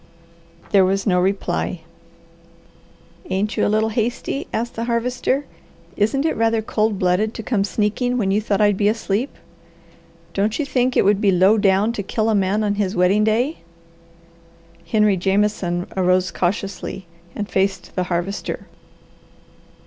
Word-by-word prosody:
There 195 -2 +6
was 195 +1 0
no 180 -3 +3
reply. 195 +2 -1 1.5
"Ain't 205 +3 -1
you - - +1
a - - +1
little 215 +1 +2
hasty?" 235 +4 -2
asked 235 +2 -2
the 230 - -3
Harvester. 245 +4 -1 0.5
"Isn't 270 +8 +1
it 320 - +1
rather 225 0 +1
cold 215 -1 0
blooded 185 +4 +1
to 225 - -6
come 210 -3 0
sneaking 220 +5 0
when 195 -5 0
you 205 +2 +2
thought 205 -1 0
I'd 205 -2 +3
be 205 - +2
asleep? 220 +3 -1 1.0
Don't 210 +3 0
you 300 - -1
think 255 -2 0
it - - +4
would 205 0 +3
be 205 - +3
low 190 +4 +5
down 200 +2 +3
to 235 - -4
kill 220 +3 -1
a - - +2
man 200 +1 +1
on 205 -1 +1
his 190 0 -1
wedding 185 +4 +3
day?" 240 +8 +1 1.3
Henry 210 -3 +3
Jameson 190 -2 0
arose 185 0 +2
cautiously 190 0 -3 0.3
and 205 - -3
faced 195 0 -1
the 185 - 0
Harvester. 180 +3 -3
205 Hz, 150 wpm, -21 LUFS, 195-225 Hz, 1.5 s, There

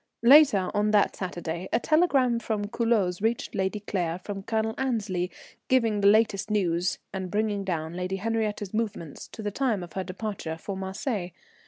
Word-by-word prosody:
_ - - +4
_Later 265 -9 +7
on 210 +1 +2
that 210 -1 +3
Saturday 175 -1 -4
a 230 - +3
telegram 270 -5 +3
from 215 -2 -2
Culoz 205 -5 0
reached 225 +2 -1
Lady 195 +1 -1
Claire 175 -5 -2
from 195 +2 -6
Colonel 220 +2 -1
Annesley 210 -9 -1 0.4
giving 230 -5 +2
the 200 - +5
latest 215 -1 +3
news, 180 -4 +1 0.2
and 190 -1 -4
bringing 205 0 0
down 165 -4 -3
Lady 180 +2 -2
Henriette's 210 -1 -2
movements 215 -9 -3
to 220 - -9
the 205 - -2
time 225 -5 0
of 175 - -10
her 190 - -2
departure 185 -4 -5
for 195 +4 -5
Marseilles. 190 +1 -3
205 Hz, 170 wpm, -27 LUFS, 185-225 Hz, 0.4 s, Later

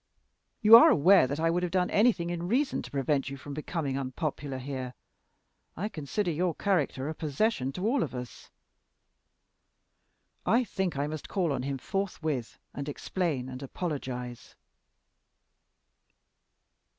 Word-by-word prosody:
You 215 +2 +10
are - - +8
aware 180 +1 +6
that 145 +3 -3
I 165 +1 +2
would 175 +1 0
have 180 -1 -2
done 180 -1 +1
anything 200 -6 +3
in 175 0 -3
reason 265 +7 +1
to - - -9
prevent 135 0 0
you 140 - -6
from 140 +2 -8
becoming 145 -2 -3
unpopular 135 +1 -3
here. 130 -1 -5 0.8
I 205 +5 -2
consider 170 +3 -2
your 170 +1 0
character 150 -8 0
a 155 - -2
possession 150 - -1
to 185 - -4
all 245 +4 +2
of 130 -4 -3
us." 125 -1 -8 1.9
"I 240 +3 +3
think 190 - -2
I 140 - 0
must 155 0 -6
call 175 -7 0
on 130 - -2
him 135 +1 -3
forthwith 160 - -3 0.2
and 140 +1 -5
explain 145 -4 -2
and 130 0 -7
apologize." 130 -5 -5
155 Hz, 140 wpm, -29 LUFS, 135-185 Hz, 1.9 s, You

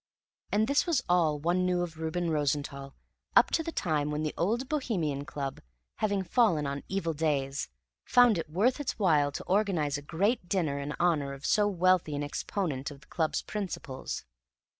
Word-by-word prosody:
And 215 +2 +2
this 280 +5 +2
was 310 -7 +2
all 170 -4 +3
one 175 +5 +1
knew 180 -1 +1
of 160 -2 -7
Reuben 165 +1 -1
Rosenthall 140 -2 -2 0.4
up - - +6
to - - +2
the 330 - -4
time 150 - 0
when 150 +1 -2
the 155 - -2
Old 230 +9 0
Bohemian 175 - -1
Club, 140 -5 -5 0.4
having 200 -2 0
fallen 185 - +2
on 140 0 -3
evil 175 -4 -1
days, 145 - -1 0.3
found 245 -6 +5
it 160 - -5
worth 220 - +2
its 290 - -3
while 150 -8 +3
to - - -6
organize 180 -8 +1
a - - -10
great 180 - 0
dinner 155 -7 0
in 140 +1 -4
honor 150 -6 +1
of 140 +1 -9
so 210 -1 +3
wealthy 185 -5 +2
an 145 - -2
exponent 145 -1 -3
of 140 -1 -12
the - - -20
club's 160 -2 0
principles. 175 - -5
165 Hz, 180 wpm, -29 LUFS, 145-200 Hz, 0.4 s, up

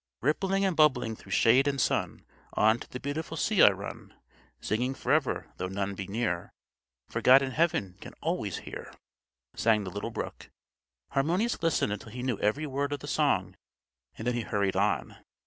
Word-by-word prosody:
"_Rippling 195 +7 +1
and 190 -3 +1
bubbling 145 -7 +3
through - - -8
shade 130 +5 +5
and 140 -1 0
sun, - - 0 0.3
On 110 +2 +4
to - - -10
the 125 - -6
beautiful 160 +4 -4
sea 205 +4 +2
I - - +10
run; 100 0 -7 0.4
Singing 125 +5 -1
forever, - - 0
though 90 - -2
none 100 +1 -2
be 95 -1 -6
near, 100 -5 -2 0.6
For - - -3
God 130 +2 +7
in 135 - -2
Heaven 125 - 0
can - - -10
always - - -2
hear,"_ - - -8 0.6
sang 110 -2 +3
the 95 - -6
little 100 +4 -4
brook. 115 - -6 0.6
Harmonius 170 +12 +1
listened 165 -10 +1
until 105 - -7
he 125 +2 -6
knew 125 -5 -1
every 125 +9 +1
word 140 0 -2
of 145 - -4
the - - -7
song, - - +1 0.6
and 110 - -6
then 125 - +1
he 120 - -1
hurried 100 -3 -1
on. 95 -8 0
125 Hz, 180 wpm, -29 LUFS, 105-145 Hz, 0.6 s, I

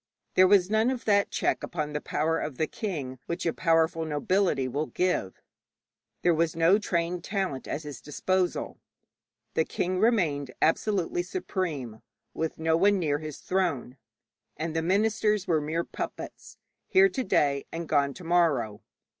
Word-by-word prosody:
There 185 0 +6
was 190 0 +4
none 220 +2 +3
of 260 -2 -3
that 200 -2 +3
check - - 0
upon 150 -3 -4
the 150 - -2
power 160 +2 0
of 145 -4 -4
the 160 - +1
king 150 - -5
which 170 - -3
a 165 - +1
powerful 165 0 +2
nobility 155 -1 +1
will 145 +5 -2
give; 180 - -1 0.8
there 175 - +4
was 160 0 +1
no 165 +5 +4
trained 170 -3 -1
talent 190 -10 -2
at 155 - -3
his 145 -2 -8
disposal. 180 +5 -1 0.7
The 160 - +2
king 185 +3 -2
remained 160 - +1
absolutely 175 +1 +1
supreme, 170 - -4 0.3
with 160 0 -3
no 160 0 +2
one 200 +4 +4
near 150 -5 0
his 155 -2 -7
throne, 165 -10 -1 0.6
and 160 0 -3
the 165 - +1
ministers 210 +2 +1
were 160 -4 +2
mere 160 +3 -1
puppets, - - -7 0.3
here 385 +1 +5
to 265 -8 -2
day 140 - +1
and 165 0 -5
gone 140 -2 +2
to 180 - -10
morrow. 165 -11 +1
165 Hz, 155 wpm, -28 LUFS, 150-190 Hz, 0.8 s, There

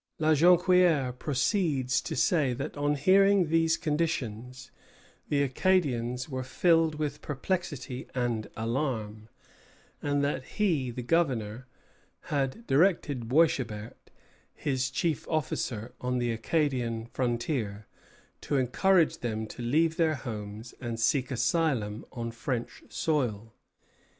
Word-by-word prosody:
La 155 0 +2
Jonquière 175 -3 +4
proceeds 135 - 0
to - - -5
say 140 -2 +2
that 135 +3 -5
on 145 0 +1
hearing 190 +3 +4
these 165 0 +3
conditions 130 -6 -3 0.6
the 140 -1 +2
Acadians 130 -5 +1
were 130 -3 -4
filled 165 +4 +2
with 150 -1 -3
perplexity 145 -5 -3
and 120 -4 -1
alarm, 110 -3 -3 0.7
and 145 0 0
that 140 -2 -1
he, 160 - 0
the 120 +1 -5
governor, 125 -6 0 0.7
had 140 - -1
directed 145 - +2
Boishébert, 125 -8 +1 0.6
his 130 -3 -1
chief 165 -5 -1
officer 125 -7 -2
on 125 0 -1
the 120 -1 0
Acadian 120 -2 -1
frontier, 120 -4 -2 0.6
to 145 - -1
encourage 165 +7 +3
them 110 -2 -3
to 110 - -9
leave 160 +7 +2
their 160 -2 +2
homes 110 -2 -7
and 115 -2 -4
seek 125 +2 +2
asylum 125 -4 0
on 115 -1 -4
French 120 +1 -4
soil. 115 -9 -1
130 Hz, 115 wpm, -29 LUFS, 120-160 Hz, 0.7 s, Jonquière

